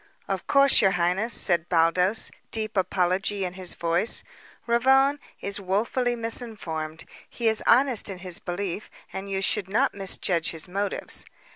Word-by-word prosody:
"Of - - -3
course, 275 0 +5
your 195 - +5
highness," 180 +7 0
said 175 -5 +1
Baldos, 180 +5 +2 0.2
deep 215 -1 -2
apology 190 +1 0
in 180 - -5
his 185 -1 -4
voice, 170 +5 +1 0.4
"Ravone 265 +4 +3 0.2
is 200 +1 -2
woefully 230 +6 0
misinformed. 205 -9 -4 0.2
He 235 - -2
is 220 -1 +2
honest 250 -3 +4
in 195 - -6
his 180 -1 -4
belief, 190 +2 -4 0.2
and 195 +1 -6
you 195 0 -2
should 195 -2 0
not 205 - +1
misjudge 185 -3 -1
his 165 +1 -6
motives. 200 +2 -1
195 Hz, 145 wpm, -25 LUFS, 180-225 Hz, 0.4 s, course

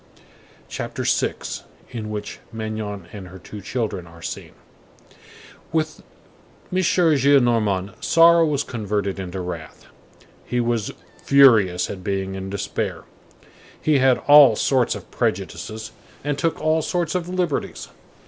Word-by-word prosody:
CHAPTER - - -5
VI—IN 110 -3 -3
WHICH 105 -1 -5
MAGNON 110 -4 -5
AND 100 -3 -8
HER 95 +1 -11
TWO 105 +2 -10
CHILDREN 100 -4 -3
ARE 85 0 -14
SEEN - - -6 1.2
With 155 -1 -1 0.7
M. - - +1
Gillenormand, 125 - +2
sorrow 170 0 +6
was 145 -3 +1
converted 105 -5 -3
into 95 0 -5
wrath; 85 -3 -7 0.6
he 125 - -2
was 120 -3 0 0.3
furious 110 -11 +5
at 95 -2 -8
being 95 -1 -2
in 95 0 -5
despair. 100 0 -3 0.8
He 150 -3 +2
had 130 -1 +4
all 145 -5 +9
sorts 130 +2 +2
of - - -10
prejudices 110 0 -3 0.3
and 145 0 -1
took 165 +2 -1
all 155 +1 +2
sorts 170 0 -1
of 180 -1 -2
liberties. 180 -5 -2
115 Hz, 120 wpm, -22 LUFS, 100-145 Hz, 1.2 s, all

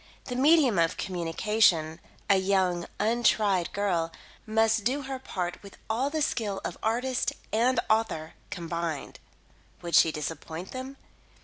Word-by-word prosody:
The 250 - -4
medium 275 - +4
of 165 -1 +2
communication 170 -2 +1 0.3
(a 200 - +5
young, 190 -2 +1
untried 210 -4 +2
girl) 175 -5 0 0.4
must 225 0 +2
do 270 +6 0
her 265 0 -5
part 180 -7 -4
with 200 -1 -13
all 255 +5 0
the 310 0 0
skill 210 -8 -1
of - - -3
artist 245 +3 0 0.2
and 245 +4 +3
author 215 -8 0 0.2
combined. 170 -3 -4 0.6
Would 170 -1 -5
she 160 - +6
disappoint 160 +3 -6
them? 260 +1 -7
200 Hz, 130 wpm, -28 LUFS, 170-240 Hz, 0.6 s, she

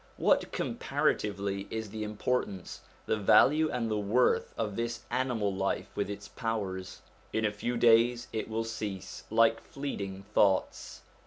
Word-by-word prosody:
What, - - +2
comparatively, 100 -1 -1
is 110 -2 -4
the 110 0 -4
importance, 105 -3 -2 0.2
the - - +1
value, 150 +9 +5
and 120 -4 -1
the 105 - +1
worth 110 +5 +2
of 105 -3 -2
this 115 0 -3
animal 120 -5 0
life 95 0 -1
with 100 -1 -1
its 100 0 -6
powers? 100 -5 -4 0.3
In 110 0 0
a 105 - +2
few 120 +4 -3
days 120 +1 +4
it 110 0 -3
will 110 +1 -1
cease 105 -4 -6
like 115 +1 +4
fleeting 100 -9 -5
thoughts. 95 -2 +1
110 Hz, 145 wpm, -30 LUFS, 100-115 Hz, 0.3 s, value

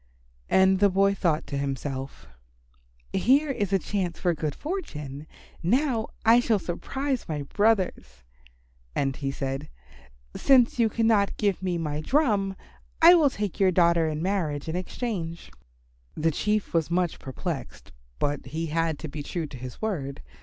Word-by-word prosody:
And 190 0 +4
the 200 0 +5
boy 195 +1 +3
thought 165 -5 0
to 140 - -4
himself, 135 -1 -4 0.9
"Here 275 +9 +3
is 205 -7 -2
a 195 - +4
chance 185 -3 -3
for 175 -2 +1
good 155 -2 -3
fortune. 150 - -5 0.3
Now 240 - +1 0.2
I 230 +2 +7
shall 230 -3 +2
surprise 265 +9 -3
my 150 -2 -2
brothers." 180 - 0 0.7
And 135 -1 0
he 140 0 -3
said, 135 0 -4 0.7
"Since 250 -3 +4
you 225 -1 +4
cannot 220 -2 +2
give 200 -3 0
me 180 -2 -1
my 150 -2 -2
drum, 205 - +1 0.4
I 335 +2 +9
will 320 -5 +5
take 205 -6 -4
your 195 -1 +5
daughter 170 -2 +3
in 155 +1 -3
marriage 165 -7 -1
in 160 - -3
exchange." 180 -3 -4 0.6
The 160 +1 +1
Chief 210 +6 -1
was 165 -2 +1
much 175 -1 0
perplexed, 130 -2 -6 0.3
but 145 0 -2
he 165 +2 -3
had 165 -2 +1
to 160 - -6
be 150 0 -6
true 165 +3 -3
to 140 - -10
his 125 - -9
word. 140 - -3
180 Hz, 155 wpm, -26 LUFS, 150-215 Hz, 0.9 s, I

